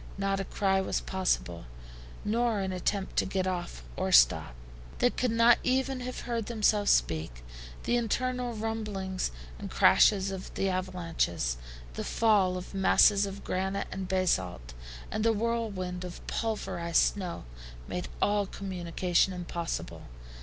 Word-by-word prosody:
Not 195 Hz, 0 st, 0 dB
a 195 Hz, -, -2 dB
cry 195 Hz, 0 st, +1 dB
was 190 Hz, -, -1 dB
possible, 180 Hz, -, -1 dB, 0.6 s
nor 230 Hz, 0 st, +1 dB
an 190 Hz, -1 st, -2 dB
attempt 190 Hz, +2 st, -2 dB
to -, -, +3 dB
get 190 Hz, -1 st, -1 dB
off 175 Hz, -, -4 dB
or -, -, -1 dB
stop. -, -, +5 dB, 0.4 s
They 245 Hz, -, +3 dB
could 250 Hz, -, 0 dB
not 230 Hz, +1 st, +5 dB
even 265 Hz, +1 st, 0 dB
have 255 Hz, 0 st, -5 dB
heard 230 Hz, -3 st, -3 dB
themselves 210 Hz, -3 st, +2 dB
speak. 80 Hz, -7 st, +1 dB, 0.4 s
The 240 Hz, -, +1 dB
internal 245 Hz, +1 st, -1 dB
rumblings, 210 Hz, -4 st, -3 dB, 0.3 s
the -, -, -5 dB
crash -, -, +6 dB
of 195 Hz, -2 st, -4 dB
the 195 Hz, -, 0 dB
avalanches, 165 Hz, -, -1 dB, 0.4 s
the -, -, -4 dB
fall 200 Hz, -5 st, +2 dB
of 180 Hz, -, -8 dB
masses 200 Hz, +1 st, +5 dB
of 195 Hz, +1 st, -8 dB
granite 190 Hz, +2 st, -2 dB
and 190 Hz, -1 st, -4 dB
basalt, 95 Hz, -, 0 dB, 0.4 s
and 215 Hz, -, -1 dB
the 225 Hz, 0 st, +4 dB
whirlwind 205 Hz, -5 st, -2 dB
of 180 Hz, -1 st, -8 dB
pulverized 170 Hz, -7 st, 0 dB
snow, 185 Hz, -4 st, -5 dB, 0.4 s
made -, -, -4 dB, 0.2 s
all 205 Hz, -1 st, +2 dB
communication 180 Hz, -1 st, 0 dB
impossible. 170 Hz, -1 st, -5 dB
195 Hz, 140 wpm, -29 LUFS, 180-220 Hz, 0.6 s, crash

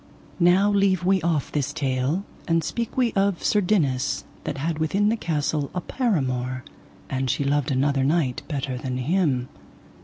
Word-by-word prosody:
Now 185 Hz, +4 st, +5 dB
leave 195 Hz, -2 st, +2 dB
we 190 Hz, 0 st, +3 dB
off 160 Hz, -4 st, 0 dB
this 145 Hz, -3 st, -1 dB
tale, 140 Hz, +5 st, -1 dB, 0.2 s
and 165 Hz, -1 st, +2 dB
speak 235 Hz, +9 st, -3 dB
we 245 Hz, -3 st, +2 dB
of 195 Hz, -2 st, +1 dB
Sir 210 Hz, -, +3 dB
Dinas 145 Hz, -10 st, +1 dB, 0.2 s
that -, -, -3 dB
had 160 Hz, +3 st, -2 dB
within 195 Hz, +7 st, +2 dB
the 225 Hz, -, +2 dB
castle 150 Hz, -6 st, -1 dB
a 180 Hz, -, -1 dB
paramour, 130 Hz, -, -1 dB, 0.4 s
and 130 Hz, -1 st, -2 dB
she 140 Hz, -, +1 dB
loved 140 Hz, 0 st, +1 dB
another 135 Hz, 0 st, +1 dB
knight 140 Hz, -3 st, +1 dB
better 135 Hz, -4 st, -3 dB
than 130 Hz, -1 st, -3 dB
him. 135 Hz, -3 st, +1 dB
155 Hz, 160 wpm, -24 LUFS, 135-190 Hz, 0.4 s, Now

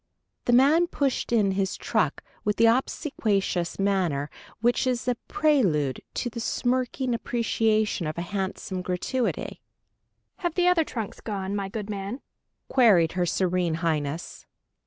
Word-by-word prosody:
The 240 Hz, -, +2 dB
man 295 Hz, +8 st, +5 dB
pushed 275 Hz, -8 st, -1 dB
in 210 Hz, -4 st, +3 dB
his 190 Hz, 0 st, -1 dB
truck, -, -, 0 dB, 0.2 s
with 210 Hz, -1 st, +1 dB
the 230 Hz, -, +4 dB
obsequious 220 Hz, -, 0 dB
manner 180 Hz, -8 st, 0 dB, 0.3 s
which 240 Hz, +3 st, +2 dB
is 250 Hz, -1 st, -1 dB
a 250 Hz, -, +3 dB
prelude 205 Hz, -, +2 dB
to -, -, -1 dB
the 235 Hz, 0 st, -5 dB
smirking 250 Hz, +2 st, 0 dB
appreciation 220 Hz, -5 st, 0 dB
of 155 Hz, -, -4 dB
a 170 Hz, -, -2 dB
handsome 190 Hz, 0 st, -3 dB
gratuity. 185 Hz, +7 st, -2 dB, 0.8 s
"Have 345 Hz, -3 st, -2 dB
the 360 Hz, -1 st, +3 dB
other 360 Hz, -2 st, +4 dB
trunks 225 Hz, -8 st, -6 dB
gone, 200 Hz, -2 st, -3 dB
my 200 Hz, -1 st, -2 dB
good 210 Hz, 0 st, -5 dB
man?" 200 Hz, +5 st, -4 dB, 0.5 s
queried 205 Hz, -11 st, +5 dB
her 180 Hz, -1 st, 0 dB
Serene 180 Hz, -2 st, +1 dB
Highness. 160 Hz, -1 st, -3 dB
210 Hz, 135 wpm, -26 LUFS, 180-245 Hz, 0.8 s, man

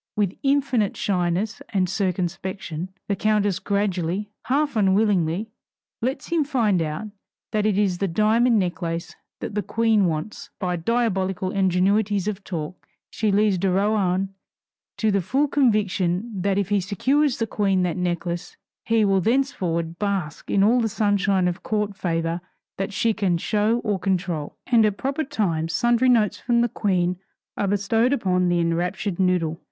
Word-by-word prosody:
With 200 Hz, -3 st, 0 dB
infinite 275 Hz, -7 st, +1 dB
shyness 185 Hz, +3 st, -1 dB
and 190 Hz, -4 st, +1 dB
circumspection, 185 Hz, -2 st, -3 dB, 0.2 s
the 200 Hz, -, 0 dB
countess 205 Hz, -2 st, +1 dB
gradually, 200 Hz, -1 st, -1 dB
half 285 Hz, +1 st, +1 dB
unwillingly, 200 Hz, -1 st, +2 dB, 0.5 s
lets 265 Hz, +4 st, -2 dB
him 335 Hz, -2 st, +2 dB
find 230 Hz, -, +1 dB
out 155 Hz, +7 st, -3 dB, 0.4 s
that 215 Hz, 0 st, +1 dB
it 205 Hz, -2 st, +1 dB
is 195 Hz, -4 st, +1 dB
the 195 Hz, -, +1 dB
diamond 220 Hz, +6 st, +3 dB
necklace 170 Hz, -2 st, -2 dB, 0.3 s
that -, -, -5 dB
the 210 Hz, -, 0 dB
Queen 220 Hz, -1 st, +2 dB
wants. 190 Hz, -, -4 dB
By 180 Hz, -2 st, -1 dB
diabolical 190 Hz, -2 st, 0 dB
ingenuities 195 Hz, +2 st, +1 dB
of 200 Hz, -2 st, -3 dB
talk 170 Hz, -2 st, -6 dB, 0.2 s
she 215 Hz, -1 st, 0 dB
leads 205 Hz, -2 st, +2 dB
de 195 Hz, +1 st, +1 dB
Rohan 195 Hz, -1 st, +1 dB, 0.6 s
to 220 Hz, -1 st, +1 dB
the 200 Hz, -1 st, +2 dB
full 265 Hz, -, +1 dB
conviction 210 Hz, -6 st, +1 dB
that 195 Hz, +1 st, +1 dB
if 200 Hz, -1 st, 0 dB
he 205 Hz, -1 st, +2 dB
secures 260 Hz, -, +1 dB
the 225 Hz, -, 0 dB
Queen 195 Hz, -3 st, +1 dB
that 175 Hz, -3 st, -1 dB
necklace, 175 Hz, -1 st, -3 dB, 0.3 s
he 225 Hz, -2 st, +3 dB
will 195 Hz, -1 st, +3 dB
thenceforward 180 Hz, -9 st, 0 dB
bask 195 Hz, -7 st, -3 dB
in 195 Hz, -, +3 dB
all 240 Hz, +4 st, +4 dB
the 225 Hz, -, 0 dB
sunshine 200 Hz, -3 st, +1 dB
of 175 Hz, -1 st, -3 dB
court 210 Hz, -2 st, -2 dB
favor 165 Hz, -1 st, -2 dB, 0.4 s
that 195 Hz, +2 st, -2 dB
she 220 Hz, +2 st, +1 dB
can 195 Hz, -5 st, +1 dB
show 215 Hz, +6 st, +1 dB
or 205 Hz, -3 st, -1 dB
control. 180 Hz, -5 st, -2 dB
And 235 Hz, -3 st, +4 dB
at 210 Hz, -2 st, +1 dB
proper 275 Hz, +4 st, -1 dB
times 165 Hz, -, -1 dB
sundry 240 Hz, +1 st, +3 dB
notes 220 Hz, -5 st, +3 dB
from 235 Hz, -1 st, +2 dB
the 240 Hz, -, +2 dB
Queen 180 Hz, -4 st, 0 dB, 0.4 s
are 200 Hz, -, -1 dB
bestowed 225 Hz, +6 st, +2 dB
upon 180 Hz, -7 st, +1 dB
the 175 Hz, 0 st, +2 dB
enraptured 175 Hz, +3 st, -1 dB
noodle. 180 Hz, -3 st, +1 dB
200 Hz, 155 wpm, -23 LUFS, 180-220 Hz, 0.6 s, all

